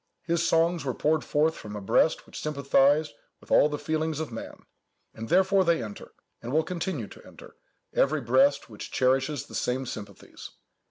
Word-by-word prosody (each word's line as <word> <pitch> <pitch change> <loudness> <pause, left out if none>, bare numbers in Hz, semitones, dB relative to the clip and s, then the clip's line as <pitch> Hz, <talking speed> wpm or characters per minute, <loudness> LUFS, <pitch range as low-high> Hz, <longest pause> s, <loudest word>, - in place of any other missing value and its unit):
His 170 0 0
songs 165 +1 +2
were 130 -3 -3
poured 155 0 +1
forth 155 +2 +1
from 105 -1 -9
a - - -4
breast 130 +10 +2
which - - -9
sympathized 140 -1 +2 0.3
with - - -18
all 150 - +5
the 150 - -3
feelings 155 0 -2
of 160 -5 -4
man; 115 - -9 0.5
and 110 0 -8
therefore 190 +1 +4
they 170 -7 +1
enter, 105 -2 -9 0.3
and 120 - -6
will 160 +3 +2
continue 170 - -3
to - - -14
enter, - - -15 0.4
every 155 +2 +2
breast 135 +4 +3
which 105 -3 -9
cherishes 135 +2 +1
the - - -15
same 130 +2 -1
sympathies. 105 -4 -9
145 Hz, 175 wpm, -27 LUFS, 125-160 Hz, 0.5 s, all